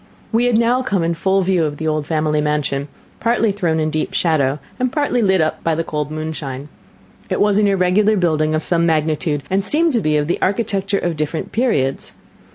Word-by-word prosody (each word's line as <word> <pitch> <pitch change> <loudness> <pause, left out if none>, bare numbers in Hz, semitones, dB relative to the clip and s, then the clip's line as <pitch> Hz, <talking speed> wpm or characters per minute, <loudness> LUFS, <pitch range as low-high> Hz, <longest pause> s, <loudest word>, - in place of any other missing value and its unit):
We 235 +2 +2
had 245 -2 +3
now 235 +2 +2
come 200 -8 0
in 170 +1 0
full 190 +3 +1
view 180 -2 +2
of 145 -1 -2
the 160 - -3
old 155 -1 -1
family 155 -1 0
mansion, 150 -2 -1 0.3
partly 230 -1 +2
thrown 175 -5 0
in 155 0 0
deep 155 0 -2
shadow, 145 -5 +1 0.2
and 255 -1 0
partly 285 -4 0
lit 190 -4 +3
up 155 - -1
by 165 -1 +1
the 165 - -1
cold 150 -2 -3
moonshine. 155 -3 -5 0.6
It - - -1
was 205 0 +3
an 210 - +3
irregular 200 +2 +2
building 155 -3 +1
of 155 - -1
some 170 -1 +1
magnitude, 155 -2 0
and 195 +1 0
seemed 320 +7 +1
to 235 - +2
be 155 -3 +1
of 145 - 0
the 175 - -2
architecture 200 -1 0
of 175 -4 -2
different 155 +2 -3
periods. 145 - 0
165 Hz, 205 wpm, -19 LUFS, 155-205 Hz, 0.6 s, had